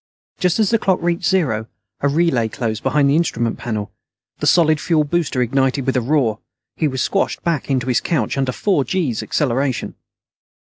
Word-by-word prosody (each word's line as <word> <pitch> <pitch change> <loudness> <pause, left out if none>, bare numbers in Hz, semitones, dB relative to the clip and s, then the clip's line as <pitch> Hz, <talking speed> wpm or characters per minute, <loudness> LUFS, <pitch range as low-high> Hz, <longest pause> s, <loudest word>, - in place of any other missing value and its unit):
Just 180 -2 +2
as 215 -2 +2
the 230 - +3
clock 190 -3 +1
reached 175 +1 -1
zero, 130 - 0 0.3
a 140 - +1
relay 140 -6 +2
closed 110 0 -3
behind 145 -2 +2
the 140 - +3
instrument 120 -9 0
panel. 105 -3 -4 0.5
The - - -1
solid 155 -3 +4
fuel 160 -3 +2
booster 145 -4 0
ignited 135 +2 0
with 130 - 0
a 125 - +2
roar. 120 -4 +1 0.4
He 155 - +1
was 130 -2 -1
squashed 195 - -1
back 165 -5 -1
into 130 -3 0
his 125 -1 +1
couch 165 - -1
under 135 -2 0
four 185 +1 +1
gees' 135 - -1
acceleration. 135 -2 -1
140 Hz, 180 wpm, -19 LUFS, 125-170 Hz, 0.5 s, solid